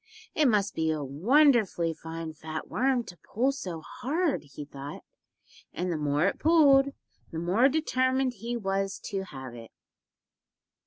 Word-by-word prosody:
It 305 -2 +3
must 205 -4 +2
be 160 0 0
a 155 -2 -1
wonderfully 200 - +3
fine 160 0 -7
fat 155 0 -6
worm 260 -1 +1
to 180 -5 -11
pull 250 +10 0
so 180 - -6
hard, 300 - -2
he 150 - -7
thought, 140 0 -9 0.7
and 180 0 -2
the - - -1
more 150 +2 +1
it 195 - 0
pulled 290 -4 +5 0.4
the 165 - -5
more 190 +11 +3
determined 260 -3 +1
he 235 +2 -4
was 195 -2 -1
to 195 -1 -2
have 130 -7 -9
it. 115 -1 -10
195 Hz, 150 wpm, -28 LUFS, 160-260 Hz, 0.7 s, pulled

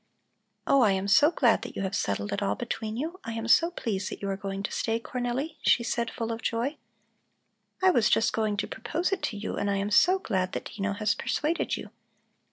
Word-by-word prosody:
"Oh, 275 - +4
I 210 -5 +5
am 190 +1 -1
so 290 +9 +6
glad 250 -9 +3
that - - -8
you - - -2
have 190 0 -2
settled 100 0 -1
it - - -2
all 100 +1 0
between 220 - -4
you! 330 +8 -4
I 230 - -5
am 225 0 -4
so 335 +8 +5
pleased 205 - -3
that - - -7
you 200 - -3
are - - -1
going 195 0 -5
to - - -3
stay, 225 0 -1
Cornelli," 250 +6 -3
she 235 - +4
said, 235 0 -1
full 230 0 -4
of 230 +1 -4
joy. 240 +7 -1 1.1
"I 375 - +7
was 235 -10 +3
just 225 0 +3
going 215 -2 0
to 200 - -1
propose 330 - -2
it 390 - -1
to 210 - -2
you, 210 - -4
and 200 - 0
I 200 - +1
am 200 +1 -2
so 365 - +5
glad 190 - -2
that - - -5
Dino 200 -1 -1
has 215 +2 +1
persuaded 315 +3 -1
you. - - -9
225 Hz, 230 wpm, -28 LUFS, 200-260 Hz, 1.1 s, I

